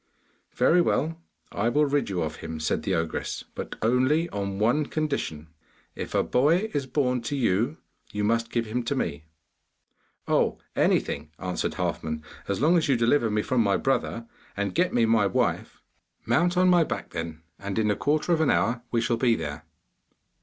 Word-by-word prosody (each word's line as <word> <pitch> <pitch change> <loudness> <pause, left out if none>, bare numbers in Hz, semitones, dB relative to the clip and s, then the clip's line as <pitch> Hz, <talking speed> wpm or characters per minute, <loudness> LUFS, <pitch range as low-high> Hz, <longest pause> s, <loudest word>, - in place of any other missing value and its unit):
'Very 175 +1 +4
well, 165 0 0 0.3
I 105 +4 0
will 150 +5 +3
rid 145 -3 0
you 90 -3 -1
of 80 0 -4
him,' 80 -1 -6
said 80 - 0
the 95 - 0
ogress, 80 -1 -3
'but - - -6
only 130 +8 +3
on 100 -1 -3
one 120 +8 +2
condition. 140 - -3 0.4
If - - -6
a - - +3
boy 165 - +2
is 140 -2 -1
born 125 -3 0
to 115 +5 -3
you, 120 - +1 0.3
you 105 0 -2
must 115 +2 +1
give 115 -1 -1
him 115 +3 -2
to 140 - -1
me!' 75 - -3 1.0
'Oh, - - +2 0.2
anything,' 75 +2 +1
answered 90 -1 -3
Halfman, 80 -1 -3 0.2
'as 100 - -1
long 165 +6 +4
as 160 - -1
you 135 - +4
deliver 115 +1 +3
me 105 0 0
from 130 -2 +1
my 100 -3 +2
brother, 130 -3 -1 0.3
and 100 -2 -1
get 180 +1 +2
me 120 -2 +3
my 110 -2 +3
wife.' 95 - -1 0.4
'Mount 170 +10 +2
on 185 0 +5
my 175 -2 +5
back, - - -5
then, 80 -1 -5 0.2
and 100 0 -4
in 105 -1 +2
a - - +1
quarter 155 - +1
of 160 - +2
an 155 - +3
hour 120 +1 +1
we 115 - +1
shall 115 0 0
be 120 -1 +3
there. 75 -3 -5
115 Hz, 185 wpm, -26 LUFS, 100-145 Hz, 1.0 s, on